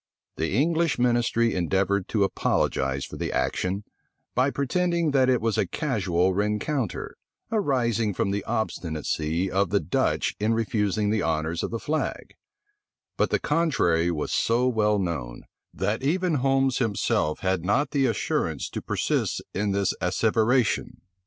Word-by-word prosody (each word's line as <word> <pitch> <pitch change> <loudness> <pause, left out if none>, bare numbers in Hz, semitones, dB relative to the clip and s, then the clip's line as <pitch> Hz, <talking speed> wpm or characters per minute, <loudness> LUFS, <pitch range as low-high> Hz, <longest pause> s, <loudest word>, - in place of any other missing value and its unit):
The 80 +6 -1
English 165 +2 +2
ministry 120 -1 +2
endeavored 95 +2 0
to 105 -3 +1
apologize 70 -7 0
for - - -9
the - - -3
action, 95 +3 -1 0.5
by 130 +3 +2
pretending 170 +4 0
that 130 -2 +3
it 125 -2 +2
was 115 -1 0
a 95 - +1
casual 95 - 0
rencounter, 105 - -2 0.4
arising 120 - +1
from 100 - 0
the 100 +1 -2
obstinacy 80 -2 -2
of 95 -1 +1
the 100 +2 +2
Dutch 75 - 0
in 110 +2 +1
refusing 105 -2 0
the 110 - +1
honors 80 +1 -1
of - - -2
the 115 - -3
flag: 155 +7 -3 0.8
but - - +1
the - - +2
contrary 135 - +1
was 80 -3 -2
so 120 +2 +2
well 105 -4 +2
known, 80 -11 -3 0.3
that 110 +4 -2
even 175 +5 +1
Holmes 135 -1 +2
himself 100 -9 0
had 95 -3 0
not 130 +9 +1
the 140 -3 +2
assurance 115 -4 -1
to - - -4
persist - - -1
in 100 +1 0
this 100 -1 +1
asseveration. 110 +5 +1
105 Hz, 145 wpm, -25 LUFS, 95-130 Hz, 0.8 s, that